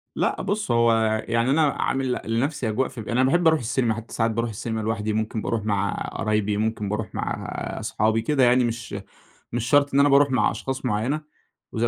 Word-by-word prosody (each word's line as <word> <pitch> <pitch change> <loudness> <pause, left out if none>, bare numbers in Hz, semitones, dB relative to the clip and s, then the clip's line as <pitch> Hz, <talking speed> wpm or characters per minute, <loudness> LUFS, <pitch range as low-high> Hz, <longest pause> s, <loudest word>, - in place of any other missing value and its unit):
لأ، - - 0
بُص 205 - -2
هو 115 0 +4 0.4
يعني 115 +2 +1
أنا 155 +3 +3
عامل 135 -2 -1
ل - - -4
لنفسي 120 +2 -1
أجواء 130 +5 0
ف 125 - -10
أنا 115 +4 0
باحب 165 +6 +3
اروح 160 -1 +4
السينما، 120 0 0
حتى 115 +1 -8
ساعات 115 0 +1
باروح 115 +2 -1
السينما 110 +1 -4
لوحدي، 110 -1 -2
ممكن 110 0 -2
باروح 110 -1 -2
مع 100 -2 0 0.2
قرايبي، 105 -1 0
ممكن 110 -1 -1
باروح 105 -1 -4
مع - - -3 0.3
اصحابي، 110 +1 0
كده 135 +3 +1
يعني 125 +1 +5
مش 115 -3 -3 0.6
مش 120 -1 -1
شرط 145 -1 +4
إن 140 - +5
أنا 145 - +5
باروح 140 0 +5
مع 125 -5 +2
أشخاص 135 0 -5
معينة، 125 +6 0 0.5
وزي 115 0 -1
115 Hz, 195 wpm, -24 LUFS, 110-130 Hz, 0.6 s, يعني